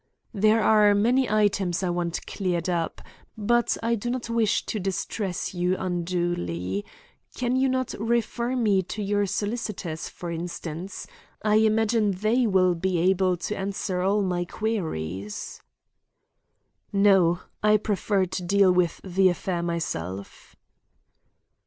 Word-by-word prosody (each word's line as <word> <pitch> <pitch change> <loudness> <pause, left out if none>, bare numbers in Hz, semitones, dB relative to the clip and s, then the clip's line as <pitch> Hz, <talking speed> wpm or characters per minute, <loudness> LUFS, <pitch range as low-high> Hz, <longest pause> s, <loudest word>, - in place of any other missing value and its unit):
"There 215 +1 +3
are 210 -2 +5
many 245 +5 +2
items 200 -4 +1
I 180 - +1
want 175 -1 -2
cleared 180 -3 -2
up, 170 -2 -2 0.3
but 240 +3 +2
I 230 +1 +1
do 235 +1 -2
not 240 -1 -3
wish 225 -3 +1
to 215 - -3
distress 190 0 -3
you 180 +1 +1
unduly. 170 - -2 0.5
Can 250 0 0
you 265 +1 +3
not 255 -1 -1
refer 235 +2 0
me 210 -6 +3
to 205 +3 -5
your 205 0 +1
solicitors, 205 -6 -3
for 175 -1 -7
instance? 170 +1 -5 0.4
I 215 0 +4
imagine 220 -1 +2
they 220 +6 +1
will 185 -3 +3
be 180 +1 -1
able 185 +1 +2
to 210 - -2
answer 190 -1 -2
all 200 +2 +2
my 180 -2 0
queries." 105 - -4 1.3
"No. 195 -4 +4 0.2
I 210 0 +5
prefer 205 -2 0
to 185 +1 -4
deal 195 +1 +4
with 180 -2 +1
the 190 0 +3
affair 175 0 -2
myself." 100 - -5
195 Hz, 130 wpm, -25 LUFS, 175-215 Hz, 1.3 s, are